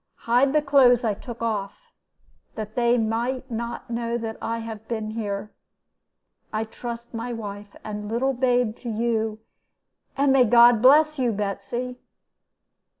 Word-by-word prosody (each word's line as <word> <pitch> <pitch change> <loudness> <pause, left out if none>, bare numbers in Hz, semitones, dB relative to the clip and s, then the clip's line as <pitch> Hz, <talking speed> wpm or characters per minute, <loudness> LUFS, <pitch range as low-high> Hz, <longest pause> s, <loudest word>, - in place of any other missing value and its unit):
Hide 245 +4 +3
the 305 -1 +3
clothes 260 -4 +5
I 220 -3 +1
took 235 +3 -8
off, 220 - -4 0.6
that 215 -1 -6
they 240 0 +2
may 235 +3 -1
not 235 +1 -4
know 230 -1 -2
I 230 0 -2
have 220 -1 -7
been 220 -2 -3
here. 210 -2 -4 1.0
I 215 0 -1
trust 235 +1 -8
my 235 +2 -4
wife 205 -2 -7
and 210 -1 -6
little 255 +4 0
babe 245 -3 +1
to 240 - -7
you, 220 -1 -1 0.8
and 275 -1 +3
may 260 -2 +6
God 235 0 +6
bless 300 +3 +5
you, 245 -2 +2
Betsy!' 210 +5 -4
230 Hz, 140 wpm, -24 LUFS, 220-245 Hz, 1.0 s, may